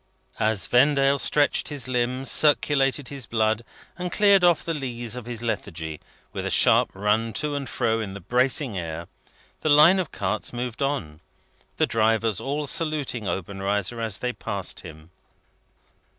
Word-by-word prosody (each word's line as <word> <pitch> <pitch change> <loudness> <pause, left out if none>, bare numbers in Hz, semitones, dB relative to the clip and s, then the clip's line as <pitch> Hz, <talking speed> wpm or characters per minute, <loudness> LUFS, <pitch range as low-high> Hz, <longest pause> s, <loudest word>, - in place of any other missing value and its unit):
As 110 -2 0
Vendale 140 +2 +3
stretched 145 -1 +2
his 145 -5 -3
limbs, 125 +1 -1
circulated 145 -3 +2
his 135 -4 -6
blood, 110 -1 +1 0.4
and 180 0 -3
cleared 200 -2 +4
off 175 -2 +3
the 165 - -1
lees 120 -5 -4
of 125 -2 -8
his 120 -1 -6
lethargy, 80 -9 -4 0.3
with - - -4
a - - -2
sharp - - +5
run 105 +3 0
to 150 -1 0
and 140 -2 -4
fro 115 -2 0
in 100 -3 -5
the - - -7
bracing 125 - +1
air, 85 0 -6 0.5
the 155 - -1
line 155 +6 +7
of 180 - -3
carts 100 +2 -3
moved 120 0 -5
on: 110 - -2 0.6
the - - +3
drivers 110 -2 +1
all 145 +2 -2
saluting 145 - -2
Obenreizer 100 +4 -2
as 110 -4 -2
they 125 0 -3
passed 100 -7 -4
him. 80 -1 -12
120 Hz, 155 wpm, -24 LUFS, 105-140 Hz, 0.6 s, line